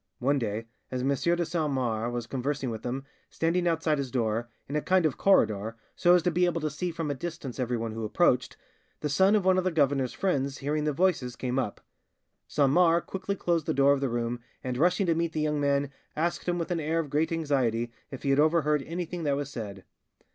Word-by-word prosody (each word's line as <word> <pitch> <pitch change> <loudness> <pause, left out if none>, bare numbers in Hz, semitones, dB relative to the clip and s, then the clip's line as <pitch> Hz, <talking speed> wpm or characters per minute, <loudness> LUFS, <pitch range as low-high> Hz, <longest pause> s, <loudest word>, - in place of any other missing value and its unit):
One 140 +3 +1
day, 110 -1 -3 0.2
as 125 -1 -3
M. 135 - +1
de 170 +5 +1
Saint 155 -3 -1
Mars 120 -3 -1
was 120 -1 -3
conversing 135 +1 -2
with 110 - -6
him, 130 +2 -3 0.3
standing 175 +2 0
outside 160 -3 +1
his 135 -2 -2
door, 120 -1 -1 0.2
in 140 - -4
a 150 - +1
kind 185 0 +3
of 150 - +1
corridor, 110 - +2 0.2
so 175 0 +5
as 175 - +3
to 180 - +2
be 180 +2 +3
able 175 -1 0
to 155 -1 -1
see 180 +5 -3
from 165 -3 -3
a - - 0
distance 145 -3 -6
everyone 120 -2 -1
who 110 +1 -5
approached, 125 +2 +2 0.4
the 150 - -1
son 190 +8 +4
of 205 -3 +1
one 185 0 +4
of - - -1
the 185 - +2
governor's 140 -5 +1
friends, 140 -7 -1
hearing 150 +2 -1
the 150 - +2
voices, 150 -6 +1
came 130 0 -1
up; 105 -6 -3 0.7
Saint 140 -2 +2
Mars 170 +1 +4
quickly 190 +1 -3
closed 170 -4 0
the - - 0
door 140 +1 +5
of 140 - -1
the 135 - 0
room, 120 0 -2 0.2
and, 125 -1 -2
rushing 180 +7 +2
to 170 - +3
meet 165 0 -1
the 155 - -1
young 150 -1 0
man, 140 -1 +1 0.2
asked 170 +3 -1
him 175 - +1
with 170 0 -3
an 170 - 0
air 160 +1 -1
of 155 -4 -2
great 155 +3 +1
anxiety 130 -8 0 0.2
if 135 - -8
he 140 - +1
had 135 - +3
overheard 150 -1 +3
anything 175 +1 -4
that 145 -3 +1
was 145 0 -4
said. 100 -7 -6
145 Hz, 230 wpm, -28 LUFS, 125-170 Hz, 0.7 s, so